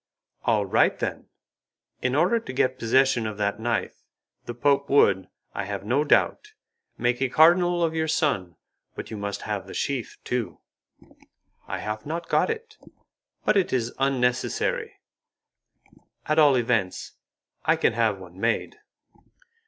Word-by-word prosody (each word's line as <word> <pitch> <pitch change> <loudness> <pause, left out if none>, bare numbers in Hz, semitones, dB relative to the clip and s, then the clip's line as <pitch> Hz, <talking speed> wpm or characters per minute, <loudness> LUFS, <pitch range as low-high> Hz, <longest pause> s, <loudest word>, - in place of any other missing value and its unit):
"All 105 -3 +2
right, 95 - +3
then. - - -4 0.7
In 130 +1 0
order 180 +10 +3
to 225 - -8
get 130 0 0
possession 120 0 +2
of 105 -1 -6
that 105 0 -1
knife, 115 +1 -2 0.5
the 120 - -5
Pope 140 +3 +1
would, 95 -9 +4 0.3
I 95 - -3
have 100 0 -5
no 130 +7 +2
doubt, 420 - +1 0.4
make 120 +1 0
a 135 - +1
cardinal 175 +4 +4
of 165 -1 +1
your 160 0 -1
son, 140 - 0 0.4
but - - -7
you 110 - -5
must 100 -1 -4
have 100 -3 -4
the - - -9
sheath 135 -4 -3
too." 120 -7 -3 1.1
"I - - -3
have 105 0 -5
not 165 +6 -5
got - - +2
it, 450 -1 -6 0.7
but - - +3
it 195 -3 +2
is 120 -2 -1
unnecessary. 130 -2 0 1.3
At 155 +1 +2
all 145 -3 +6
events 115 -6 0 0.5
I - - +4
can - - +1
have 110 -3 +1
one 90 -1 -13
made." 115 - -1
125 Hz, 145 wpm, -25 LUFS, 105-150 Hz, 1.3 s, all